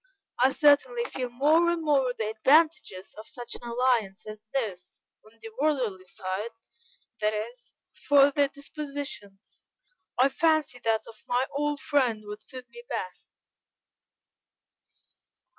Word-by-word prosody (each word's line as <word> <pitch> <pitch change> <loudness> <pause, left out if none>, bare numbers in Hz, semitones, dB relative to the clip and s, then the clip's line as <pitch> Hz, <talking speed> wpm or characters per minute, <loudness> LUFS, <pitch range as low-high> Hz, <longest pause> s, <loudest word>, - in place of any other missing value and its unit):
I 260 +2 +5
certainly 400 - +4
feel 255 - -4
more 305 +8 +4
and 340 -1 -1
more 275 -4 +3
the 215 -1 -1
advantages 275 - +2
of 215 - -10
such 245 -6 -6
an - - -5
alliance 235 -5 +1
as 215 0 -10
this, 205 -9 -4 0.2
on 220 +1 -21
the 225 0 -9
worldly 245 -11 0
side, 190 +4 -4 0.7
that 215 0 +1
is; 235 +3 -7 0.3
for 285 -1 +7
their 285 0 +3
dispositions, 280 -8 -7 0.5
I 260 +2 +5
fancy 310 -4 +1
that 225 -2 0
of 220 - -14
my 245 +1 +2
old 295 0 -1
friend 245 -7 +1
would 210 +1 -7
suit 255 -2 -9
me 475 - -11
best." 460 - -5
255 Hz, 130 wpm, -27 LUFS, 215-290 Hz, 0.7 s, for